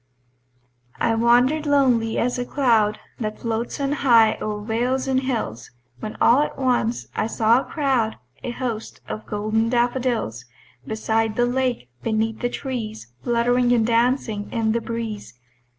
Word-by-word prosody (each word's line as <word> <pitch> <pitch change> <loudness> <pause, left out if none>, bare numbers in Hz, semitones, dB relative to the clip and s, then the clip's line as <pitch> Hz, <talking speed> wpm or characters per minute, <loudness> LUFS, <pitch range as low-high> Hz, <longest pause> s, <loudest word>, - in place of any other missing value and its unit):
I 225 - +2
wander'd 245 +7 +3
lonely 250 -6 +3
as 250 +1 0
a - - 0
cloud 230 -6 +2 0.2
That 215 -2 -3
floats 230 +3 -3
on 275 0 0
high 235 -6 +5
o'er 210 -1 -3
vales 250 +4 0
and 260 -1 +2
hills, 230 - -3 0.3
When 215 - -6
all 240 +4 +5
at 300 - -2
once 245 -3 0
I 215 - 0
saw 230 +1 +3
a - - -9
crowd, 255 -6 0 0.3
A - - -4
host 240 -3 -4
of 215 - -6
golden 215 +2 0
daffodils, 240 - 0 0.4
Beside 220 0 0
the 240 - +3
lake, 245 - -1
beneath 220 0 -1
the 245 - 0
trees, 220 - -5
Fluttering 245 +1 +2
and 230 -2 +3
dancing 230 -2 +1
in 225 -2 +1
the 235 +1 0
breeze. 220 - -5
235 Hz, 150 wpm, -23 LUFS, 220-250 Hz, 0.4 s, high